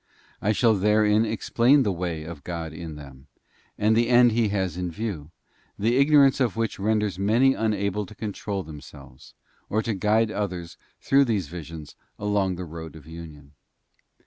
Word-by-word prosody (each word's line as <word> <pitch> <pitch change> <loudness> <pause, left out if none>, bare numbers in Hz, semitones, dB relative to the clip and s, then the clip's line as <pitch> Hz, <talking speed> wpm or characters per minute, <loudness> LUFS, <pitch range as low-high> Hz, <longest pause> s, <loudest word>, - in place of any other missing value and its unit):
I 105 - +2
shall 115 +1 +3
therein 105 +2 +3
explain 120 +5 +3
the 105 - 0
way 85 -3 -3
of 80 -2 -9
Godin 80 -2 -6
them, 70 -2 -12 0.5
and 110 +1 +3
the 115 +1 +2
end 120 -1 +6
He 115 0 +2
has 95 -4 -1
in 90 0 -3
view, 85 -5 -5 0.5
the 115 +4 +1
ignorance 140 -1 +5
of 125 -4 +1
which 115 -3 -2
renders 105 -2 0
many 115 +7 +3
unable 105 -3 -1
to 105 - -13
control 100 -2 -4
them 75 -3 -10
selves, 70 -4 -15 0.3
or 110 +1 0
to 115 - -1
guide 105 +2 +2
others 90 -6 -4 0.3
through 140 +1 +4
these 100 - -1
visions 80 -2 -9 0.2
along 100 -3 0
the 90 +1 -6
road 80 0 -9
of 75 -3 -13
union. 80 -3 -11
100 Hz, 165 wpm, -25 LUFS, 85-110 Hz, 0.5 s, end